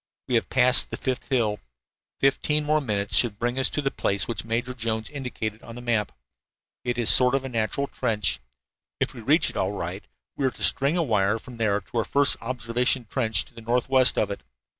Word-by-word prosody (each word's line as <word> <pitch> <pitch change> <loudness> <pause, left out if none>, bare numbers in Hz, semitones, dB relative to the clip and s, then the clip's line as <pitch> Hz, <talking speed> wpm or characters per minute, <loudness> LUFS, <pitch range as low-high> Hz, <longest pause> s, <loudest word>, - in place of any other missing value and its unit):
"We 125 - -3
have 115 - +1
passed 125 +1 +3
the - - -5
fifth 130 -2 -3
hill. 115 -6 +1 0.6
Fifteen 150 +2 +1
more 155 +1 +2
minutes 105 -6 -1
should 115 -5 +3
bring 120 +3 -1
us 130 - +3
to 150 - -2
the 135 - 0
place 100 0 -1
which 115 - -2
Major 120 +3 -2
Jones 110 -2 -3
indicated 120 -6 -5
on 115 - -11
the 120 - -8
map. 115 -4 0 0.7
It 120 -1 -2
is 120 -2 +6
a - - +9
sort 125 +1 +5
of 135 - -1
natural 125 +2 -1
trench. 105 - -1 0.6
If - - -1
we - - -9
reach - - +3
it - - -9
all - - 0
right - - -5 0.3
we 135 - 0
are - - +2
to - - -9
string 140 +5 +3
a 170 - +2
wire 105 -5 +1
from 120 +1 -12
there 105 -3 +1
to 120 - -8
our - - +1
first 140 +4 +3
observation 120 +1 0
trench 115 -4 0
to - - -20
the 115 - -11
northwest 125 +3 +2
of 105 - +1
it. 100 - -6
120 Hz, 215 wpm, -25 LUFS, 110-130 Hz, 0.7 s, a